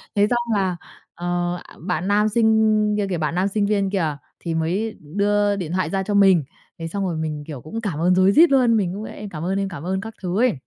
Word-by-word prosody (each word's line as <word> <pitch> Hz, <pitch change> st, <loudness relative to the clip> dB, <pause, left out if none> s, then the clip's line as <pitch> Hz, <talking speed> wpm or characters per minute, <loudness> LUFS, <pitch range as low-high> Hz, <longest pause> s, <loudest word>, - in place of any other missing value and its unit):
thế 205 Hz, +1 st, +4 dB
xong 240 Hz, -2 st, 0 dB
là, 185 Hz, -2 st, 0 dB, 0.4 s
ờ, 175 Hz, 0 st, -2 dB
à, -, -, -16 dB
bạn 180 Hz, +2 st, -2 dB
nam 210 Hz, +1 st, +3 dB
sinh 220 Hz, -1 st, +3 dB
kia 205 Hz, -1 st, 0 dB
kìa, 180 Hz, -, -1 dB
bạn 155 Hz, +1 st, -2 dB
nam 185 Hz, +2 st, +1 dB
sinh 200 Hz, 0 st, 0 dB
viên 200 Hz, -2 st, +1 dB
kìa 160 Hz, -7 st, -1 dB, 0.2 s
thì 165 Hz, -2 st, -4 dB
mới 185 Hz, +8 st, -1 dB
đưa 205 Hz, +5 st, +1 dB
điện 175 Hz, -5 st, -4 dB
thoại 185 Hz, -3 st, 0 dB
ra 195 Hz, +1 st, -1 dB
cho 205 Hz, +1 st, -3 dB
mình. 190 Hz, -6 st, +5 dB, 0.4 s
Thế 165 Hz, -, -4 dB
xong 195 Hz, +3 st, -3 dB
rồi 170 Hz, -3 st, -2 dB
mình, 155 Hz, -2 st, -3 dB
kiểu, 145 Hz, -6 st, -7 dB
cũng 225 Hz, -, -6 dB
cảm 180 Hz, -9 st, -3 dB
ơn 180 Hz, +2 st, +3 dB
rối 185 Hz, +1 st, +5 dB
rít 330 Hz, +9 st, +6 dB
luôn, 245 Hz, -4 st, +4 dB
mình 185 Hz, -3 st, 0 dB
cũng: 210 Hz, +2 st, -6 dB
"Em 210 Hz, -2 st, -8 dB
cảm 160 Hz, -2 st, -6 dB
ơn 195 Hz, +2 st, 0 dB
anh. 195 Hz, -, -1 dB
Cảm 170 Hz, -6 st, -8 dB
ơn." 190 Hz, +2 st, -2 dB
các 225 Hz, +1 st, -8 dB
thứ 180 Hz, +2 st, -2 dB
ấy. 250 Hz, -5 st, +3 dB
195 Hz, 255 wpm, -22 LUFS, 175-210 Hz, 0.4 s, rít